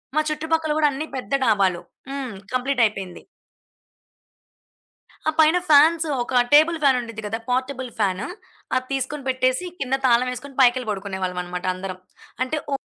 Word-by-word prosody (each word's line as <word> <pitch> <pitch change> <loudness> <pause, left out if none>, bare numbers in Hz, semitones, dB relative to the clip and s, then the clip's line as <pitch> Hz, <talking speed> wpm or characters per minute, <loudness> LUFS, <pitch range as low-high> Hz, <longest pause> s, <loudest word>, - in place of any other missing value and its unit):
మా 310 - +4
చుట్టుపక్కల 320 0 -1
కూడా 300 -1 +4
అన్నీ 305 +3 -4
పెద్ద 255 0 -6
డాబాలు. 195 -5 +2 0.3
హ్మ్, 265 -5 -4 0.2
కంప్లీట్ 255 0 0
అయిపోయింది. 195 -4 -4 2.1
ఆ - - +2
పైన 315 +3 +6
ఫ్యాన్స్. 315 +3 +6 0.2
ఒక 250 0 +2
టేబుల్ 315 +3 +6
ఫ్యాన్ 265 -2 +5
ఉంటుంది 230 -2 -8
కదా! 225 +2 -3
Portable 260 0 -2
fan. 190 -2 0 0.5
అది 255 0 -1
తీసుకొని 270 +2 -3
పెట్టేసి, 255 +5 +1
కింద 270 0 0
తాళం 245 0 +4
వేసుకొని 270 +2 -8
పైకెళ్లి 250 -2 +3
పడుకునే 195 -1 -5
వాళ్ళం 180 -1 -2
అన్నమాట 180 +1 -6
అందరం. 185 0 -6 0.4
అంటే 305 +4 -2
వు 275 - 0
255 Hz, 150 wpm, -23 LUFS, 210-285 Hz, 2.1 s, పైన